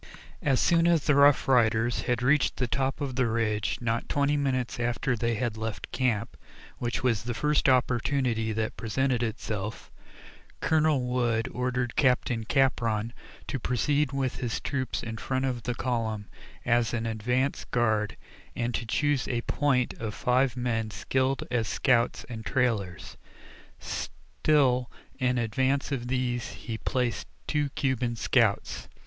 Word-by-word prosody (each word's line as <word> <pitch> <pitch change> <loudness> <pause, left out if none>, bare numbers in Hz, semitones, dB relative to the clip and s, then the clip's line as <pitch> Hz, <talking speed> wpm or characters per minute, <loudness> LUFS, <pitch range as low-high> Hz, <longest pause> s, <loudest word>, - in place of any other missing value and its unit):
As 135 -3 +2
soon 170 0 +4
as 170 -4 +3
the 150 - +4
Rough 140 0 +5
Riders 120 -2 +3
had 125 0 +1
reached 140 +2 +3
the 125 - +1
top 135 +3 -1
of 135 -3 -3
the 125 -1 +2
ridge, 110 -2 0
not 115 -1 -1
twenty 145 +1 +2
minutes 130 -4 -1
after 120 +2 0
they 115 +1 0
had 115 -1 -2
left 110 -1 -5
camp, 120 -3 0 0.4
which 120 +1 -2
was 115 -5 +2
the 120 +1 -4
first 150 +1 +2
opportunity 125 -2 +1
that 110 0 -2
presented 125 +2 0
itself, 110 -2 -4 0.7
Colonel 155 -3 +2
Wood 120 -2 0
ordered 125 -1 -1
Captain 125 -4 +2
Capron 115 -4 +1 0.3
to 135 - -3
proceed 140 +4 +1
with 135 -2 -1
his 120 -2 -2
troop 130 -4 -3
in 115 -1 -5
front 130 +3 -1
of 125 -3 -2
the 120 +1 -3
column 115 -4 -2 0.4
as 120 0 +2
an 115 -1 -2
advance 125 +5 0
guard, 110 -3 0 0.4
and 120 0 -1
to 115 +1 -3
choose 145 +3 +1
a 120 -2 -1
"point" 130 -2 +1
of 110 -2 -4
five 130 -1 +1
men 115 -3 -1
skilled 130 +5 0
as 115 -3 +1
scouts 125 -2 +2
and 110 -2 -7
trailers. 110 -8 -1 0.6
Still 130 -5 0 0.3
in 125 -1 +1
advance 130 +5 0
of 125 -3 -2
these 125 -1 -1
he 110 -2 -6
placed 125 -4 -1 0.2
two 150 -2 0
Cuban 125 -3 0
scouts. - - +1
125 Hz, 145 wpm, -28 LUFS, 115-130 Hz, 0.7 s, Rough